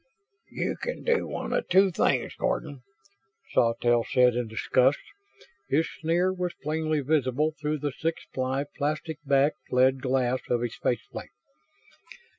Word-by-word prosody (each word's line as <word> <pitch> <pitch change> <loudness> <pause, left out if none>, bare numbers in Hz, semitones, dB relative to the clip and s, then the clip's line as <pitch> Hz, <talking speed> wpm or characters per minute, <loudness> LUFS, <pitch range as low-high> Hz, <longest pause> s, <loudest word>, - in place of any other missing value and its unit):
"You - - -2
can - - -5
do 475 -1 +1
one - - -4
of - - 0
two 190 0 +5
things, - - +1
Gordon," 140 -3 -2 0.7
Sawtelle 120 0 +3
said 125 0 +4
in 120 -1 -1
disgust. 125 +5 +2 0.7
His 155 +4 +2
sneer 175 +3 +2
was 180 -1 -3
plainly 155 0 0
visible 145 +1 +1
through 150 +1 0
the 145 0 -2
six 160 +5 -3
ply, 130 +1 -1
plastic 155 +1 -2
backed 140 +2 +1
lead 130 +1 +3
glass 130 -1 +1
of 120 -1 +1
his 120 -2 -2
face 120 -3 -1
plate. - - -7
140 Hz, 140 wpm, -27 LUFS, 125-160 Hz, 0.7 s, two